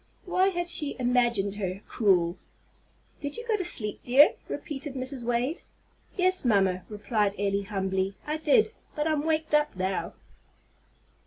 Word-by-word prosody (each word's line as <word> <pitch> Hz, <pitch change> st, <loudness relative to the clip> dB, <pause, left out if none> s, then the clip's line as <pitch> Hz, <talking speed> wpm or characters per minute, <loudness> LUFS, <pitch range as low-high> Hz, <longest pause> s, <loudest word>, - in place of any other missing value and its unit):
Why 370 Hz, +1 st, +2 dB
had 350 Hz, -2 st, -1 dB
she 300 Hz, -4 st, +2 dB
imagined 240 Hz, -5 st, +1 dB
her 190 Hz, -1 st, -3 dB
cruel? 180 Hz, -6 st, +2 dB, 0.8 s
"Did 285 Hz, -1 st, -4 dB
you 470 Hz, 0 st, -7 dB
go 445 Hz, -, +2 dB
to 390 Hz, -, -2 dB
sleep, 215 Hz, -12 st, -1 dB
dear?" 270 Hz, +4 st, +6 dB
repeated 290 Hz, -2 st, -6 dB
Mrs. 260 Hz, -1 st, -4 dB
Wade. 245 Hz, +7 st, -1 dB, 0.6 s
"Yes, 370 Hz, 0 st, +3 dB
mamma," 195 Hz, -6 st, +2 dB
replied 210 Hz, -1 st, -1 dB
Elly, 200 Hz, 0 st, 0 dB
humbly; 190 Hz, -1 st, -2 dB
"I 305 Hz, +1 st, -2 dB
did. 320 Hz, +8 st, +3 dB, 0.2 s
But 300 Hz, +1 st, 0 dB
I'm 305 Hz, -2 st, 0 dB
waked 315 Hz, -1 st, 0 dB
up 300 Hz, -5 st, +2 dB
now." 190 Hz, +1 st, -2 dB
250 Hz, 145 wpm, -27 LUFS, 200-310 Hz, 0.8 s, dear